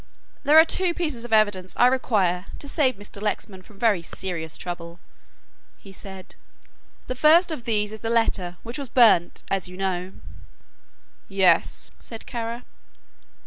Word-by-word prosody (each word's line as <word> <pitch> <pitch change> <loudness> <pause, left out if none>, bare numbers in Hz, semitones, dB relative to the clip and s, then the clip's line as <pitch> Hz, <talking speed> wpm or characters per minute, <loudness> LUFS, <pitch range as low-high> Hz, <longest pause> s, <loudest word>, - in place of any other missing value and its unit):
"There 295 +2 +5
are 320 - +9
two 350 0 0
pieces 300 -9 -3
of 240 - -9
evidence 205 -4 +2
I 245 - +6
require 200 -8 +1
to 285 - -7
save 275 -3 +1
Mr. 205 0 -12
Lexman 205 -2 -3
from 200 +2 -18
very 210 -5 +2
serious 165 -2 -5
trouble," 175 -1 -7 0.8
he 195 - -14
said, 190 -1 -10 0.7
"the - - -3
first 320 +7 +5
of 280 -7 -6
these 210 -2 0
is 220 - -8
the 225 - -3
letter 190 -6 0
which 235 +4 -6
was 275 -3 -6
burnt, 220 -9 +4
as 195 -3 0
you 180 0 -11
know." 190 -1 -3 1.2
"Yes," 195 -2 +2
said 225 -2 -9
Kara. 235 0 -5
210 Hz, 150 wpm, -24 LUFS, 185-245 Hz, 1.2 s, are